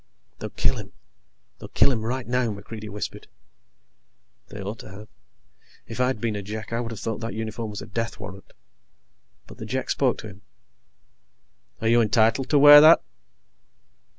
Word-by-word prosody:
"They'll - - -5
kill - - 0
him. - - -9 0.7
They'll - - -9
kill 140 - +3
him 115 -4 -2
right 125 +2 -3
now," 125 -1 0
MacReidie 105 +1 -8
whispered. 105 +1 -6 1.2
They 105 - -10
ought 100 +3 -6
to - - -11
have. 105 +3 -12 0.8
If 115 +2 -9
I'd 125 -2 0
been 110 -1 -2
a 100 - -4
Jek, 110 +3 -7
I 115 - 0
would 120 -1 -4
have 115 -3 -7
thought 110 +2 -4
that 115 0 -5
uniform 110 0 -4
was 105 -1 -7
a - - -9
death 115 +1 -4
warrant. 100 -2 -10 0.9
But - - -15
the 110 - -6
Jek 130 +3 -2
spoke 130 -3 +1
to 110 - -8
him: 100 -1 -13 1.4
"Are 110 - 0
you 120 +1 +5
entitled 115 +4 +2
to 150 - +3
wear 145 +1 +10
that?" 160 +2 +7
110 Hz, 175 wpm, -24 LUFS, 105-120 Hz, 1.4 s, wear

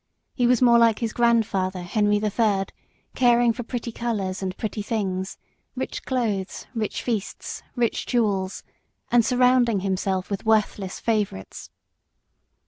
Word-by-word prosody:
He 245 -3 +2
was 250 0 +3
more 235 -1 +6
like 230 -2 +4
his 230 -2 -3
grandfather 200 -6 +1
Henry 205 +3 +2
the 210 0 -1
Third, 200 -3 +1 0.4
caring 240 -2 +4
for 245 - -5
pretty 235 0 -4
colours 205 -5 -3
and 185 -1 -4
pretty 215 -1 -3
things, 195 -3 -2 0.4
rich - - -4
clothes, 215 -7 -2
rich 220 -3 -3
feasts, 220 -5 -3
rich 240 -2 0
jewels, 200 -6 0 0.5
and 240 -1 +5
surrounding 250 -3 +3
himself 190 0 -1
with 200 - -2
worthless 210 -3 +1
favourites. 210 - -2
220 Hz, 135 wpm, -24 LUFS, 195-235 Hz, 0.5 s, more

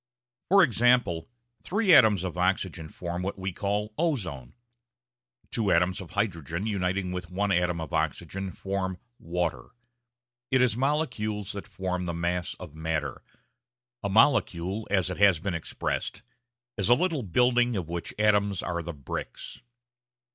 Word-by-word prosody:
For 195 +1 +7
example, 120 - +2 0.3
three 205 -1 +3
atoms 110 - +6
of 90 -2 -3
oxygen 90 -3 -1
form 85 +2 -5
what 95 +2 -3
we 95 0 -3
call 105 +3 -2
ozone; 95 - -2 1.0
two 110 -4 +1
atoms 90 +2 +2
of 90 - -9
hydrogen 90 -3 -2
uniting 95 -3 -1
with 90 -1 -5
one 100 +2 0
atom 90 -2 +1
of 80 +1 -6
oxygen 80 +5 -2
form 95 -1 -3 0.2
water. 85 -7 -2 0.8
It 130 - +3
is 125 -3 +3
molecules 120 -7 -1
that 100 - -7
form 90 -1 -3
the 85 -1 -3
mass 85 +1 -1
of 90 -5 -10
matter; 80 0 -3 0.8
a 100 - -2
molecule, 100 -3 +2
as 95 -2 +1
it - - -5
has 100 -5 +6
been 95 +2 -2
expressed, 85 - -3 0.5
is 100 +1 +1
a 120 - +8
little 165 -2 0
building 120 +4 +2
of 90 -5 -3
which 85 0 -4
atoms 100 -2 +2
are 85 0 -2
the 85 +1 -6
bricks. 70 -4 -7
95 Hz, 145 wpm, -27 LUFS, 85-110 Hz, 1.0 s, a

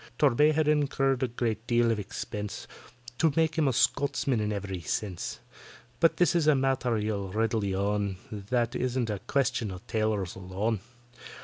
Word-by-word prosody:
TORBAY 150 +2 +4
had 155 0 +1
incurred 135 -3 +2
a 130 - +2
good 115 -1 -3
deal 120 -1 +3
of 110 - 0
expense 105 0 -5 0.5
To 160 - +4
make 160 -1 +2
him 160 -3 +2
a - - +3
Scotchman 135 0 +1
in 105 0 -1
every 100 -2 -3
sense; 90 +2 -3 0.6
But 165 - +4
this 175 - +4
is 165 -3 +2
a 155 - +6
matter, 130 -3 +1
you'll 105 -2 -2
readily 110 -2 0
own, 100 0 0 0.2
That 115 +3 -1
isn't 125 -2 -1
a 105 - -3
question 135 -5 +1
of 90 -1 -8
tailors 110 -5 -1
alone. 95 +4 -2
115 Hz, 165 wpm, -28 LUFS, 105-135 Hz, 0.6 s, a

